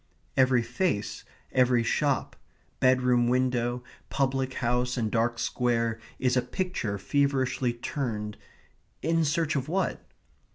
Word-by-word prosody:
Every 130 -2 +4
face, 120 - -1 0.3
every 125 -2 +3
shop, 140 +3 0 0.4
bedroom 125 -1 +4
window, 125 -1 +1 0.3
public 135 -1 0
house, 125 +1 0
and 110 -3 -1
dark 115 +1 +1
square 115 -2 0 0.2
is 125 -1 +1
a 125 - +4
picture 125 - -3
feverishly 130 +1 +1
turned 115 -4 -3 0.7
in 165 0 +2
search 155 +1 +1
of 135 +1 -2
what? 190 +3 -1
125 Hz, 115 wpm, -28 LUFS, 120-135 Hz, 0.7 s, Every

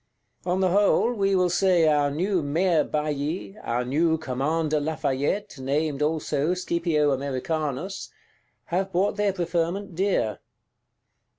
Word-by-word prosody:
On 180 +2 +1
the 185 - +3
whole, 205 +4 +3
we 195 -3 +1
will 180 -1 +2
say 175 -2 +3
our 145 -2 +3
new 180 +5 0
Mayor 160 +3 +2
Bailly; 150 +5 -3
our 120 +1 -1
new 160 +5 +2
Commander 155 +2 -1
Lafayette, 145 +3 -2
named 145 +2 -1
also 155 +1 0
"Scipio 170 -4 +1
Americanus," 140 +6 -3 0.6
have 190 +2 0
bought 190 +4 +1
their 205 -1 +1
preferment 180 +1 -2
dear. 185 - 0
160 Hz, 120 wpm, -25 LUFS, 145-185 Hz, 0.6 s, the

